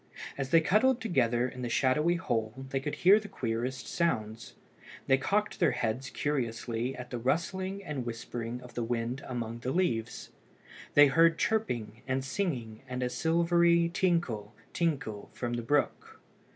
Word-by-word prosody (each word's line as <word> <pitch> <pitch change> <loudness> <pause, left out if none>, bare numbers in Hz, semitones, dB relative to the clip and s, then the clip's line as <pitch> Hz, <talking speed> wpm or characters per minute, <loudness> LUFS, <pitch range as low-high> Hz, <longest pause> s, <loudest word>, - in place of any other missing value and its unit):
As 135 -1 -3
they 165 +2 +6
cuddled 235 +9 +3
together 125 - +1
in 125 0 -8
the 120 - -3
shadowy 150 +8 +2
hole 120 -4 -2
they 135 - -1
could 145 +2 -4
hear 195 +4 +6
the 210 - -9
queerest 125 - -3
sounds. 115 -10 -2 0.5
They 135 0 +4
cocked 210 +8 0
their - - +3
heads 125 +2 -2
curiously 120 -3 -2
at 125 0 -9
the 120 - -3
rustling 185 +9 -1
and 145 -7 -4
whispering 120 +1 -5
of 125 -1 -12
the 120 - -3
wind 120 +2 -2
among 120 -2 -4
the 125 - -3
leaves. 120 -11 -1 0.6
They 145 - +9
heard 165 +3 +4
chirping 120 - -1
and 130 0 -1
singing 130 - -3
and 125 0 -3
a 125 - -1
silvery 170 +3 +3
tinkle, 130 - 0 0.2
tinkle 140 -11 -2
from 120 -1 -3
the 120 - -1
brook. 145 +5 -1
130 Hz, 155 wpm, -30 LUFS, 120-170 Hz, 0.6 s, They